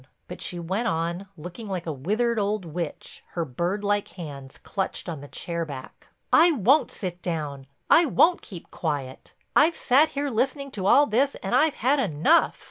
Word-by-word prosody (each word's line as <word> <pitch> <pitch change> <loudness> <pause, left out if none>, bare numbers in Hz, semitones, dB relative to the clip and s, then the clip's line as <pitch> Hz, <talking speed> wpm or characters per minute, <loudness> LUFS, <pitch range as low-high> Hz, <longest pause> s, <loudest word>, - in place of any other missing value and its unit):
But - - -9
she 180 - -2
went 190 +7 -2
on, 170 +3 -2
looking 180 +8 -8
like 185 -3 -4
a 165 - -2
withered 215 - 0
old 205 -1 -1
witch, 165 -1 -6
with - - -30
her 170 -2 -1
bird 175 +9 -2
like 205 0 0
hands 140 -6 -9
clutched 195 -1 -4
on 160 -5 -5
the 145 - -10
chair 170 +3 -4
back: 140 -5 -9 0.3
"I 335 +2 +7
won't 270 +5 +3
sit 180 -2 -5
down, 150 -6 -4 0.2
I 335 0 +6
won't 345 +5 +4
keep 180 -6 -11
quiet. 145 -5 -4 0.2
I've 320 +3 +5
sat 275 +5 +4
here 285 0 -3
listening 275 +4 -1
to 190 -5 -3
all 285 +7 +6
this 270 +4 +1
and - - -3
I've 310 -1 +3
had 270 +5 +2
enough. 200 - +3
190 Hz, 185 wpm, -25 LUFS, 165-255 Hz, 0.3 s, I